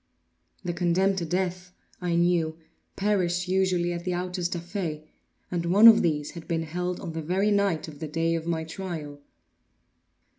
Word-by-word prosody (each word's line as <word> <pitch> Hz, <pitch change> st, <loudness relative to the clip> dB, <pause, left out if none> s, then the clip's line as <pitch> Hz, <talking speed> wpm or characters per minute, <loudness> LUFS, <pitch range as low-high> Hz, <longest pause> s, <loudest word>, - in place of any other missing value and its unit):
The 175 Hz, -2 st, -2 dB
condemned 185 Hz, +3 st, +2 dB
to 170 Hz, -, -3 dB
death, 180 Hz, +1 st, -2 dB, 0.3 s
I 175 Hz, -1 st, 0 dB
knew, 170 Hz, -2 st, +2 dB, 0.4 s
perished 180 Hz, -3 st, 0 dB
usually 185 Hz, -2 st, +1 dB
at 170 Hz, 0 st, -5 dB
the 180 Hz, 0 st, -1 dB
autos 180 Hz, 0 st, -2 dB
da 175 Hz, -, -3 dB
fe, 170 Hz, -4 st, -5 dB, 0.4 s
and 170 Hz, -1 st, -1 dB
one 205 Hz, +6 st, +8 dB
of 225 Hz, -, +9 dB
these 150 Hz, -3 st, 0 dB
had 170 Hz, -2 st, -10 dB
been 165 Hz, -1 st, -1 dB
held 180 Hz, +3 st, -3 dB
on 165 Hz, -, -6 dB
the 160 Hz, -, -3 dB
very 190 Hz, +6 st, +1 dB
night 200 Hz, -6 st, +1 dB
of 150 Hz, -2 st, -10 dB
the 155 Hz, -, -4 dB
day 165 Hz, +2 st, 0 dB
of 165 Hz, 0 st, -3 dB
my 165 Hz, -1 st, -1 dB
trial. 160 Hz, -4 st, -6 dB
175 Hz, 175 wpm, -27 LUFS, 165-185 Hz, 0.4 s, of